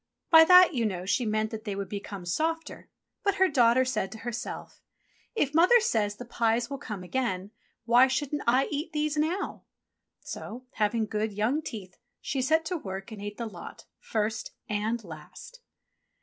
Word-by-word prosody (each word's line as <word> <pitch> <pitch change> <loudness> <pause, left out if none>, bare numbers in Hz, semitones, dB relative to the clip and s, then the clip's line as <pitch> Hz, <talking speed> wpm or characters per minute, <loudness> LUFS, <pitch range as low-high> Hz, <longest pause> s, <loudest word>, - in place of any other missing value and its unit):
By 320 -1 +9
that, 360 0 +8
you 240 -4 0
know, 185 -4 -2
she 230 +4 0
meant 215 0 0
that 220 -1 -6
they 205 -3 -4
would 200 0 -4
become 200 -1 -6
softer; 325 - -2 0.3
but 400 -1 +2
her 380 -1 +4
daughter 255 -3 +4
said 255 -6 -2
to - - -8
herself, 235 +1 -6 0.5
"If 290 -9 0
Mother 360 +10 +6
says 215 - 0
the 245 - -9
pies 235 +2 0
will 275 - -4
come 210 -8 -6
again, 195 -2 -2 0.3
why 245 +2 +6
shouldn't 290 +2 -2
I 255 +3 +4
eat 300 +2 -3
these 305 0 0
now.?" 320 +6 -1 0.6
So, 245 +4 -8
having 220 +1 0
good, 215 0 -2
young 225 +9 0
teeth, 205 -11 -8 0.2
she 265 - -2
set 320 +5 +2
to 360 +2 -2
work 195 -5 -7
and 215 -2 -8
ate 205 0 -6
the 235 - -3
lot, 185 -6 -10
first 220 0 -2
and 220 +1 -1
last. 170 - -11
235 Hz, 175 wpm, -28 LUFS, 210-295 Hz, 0.6 s, By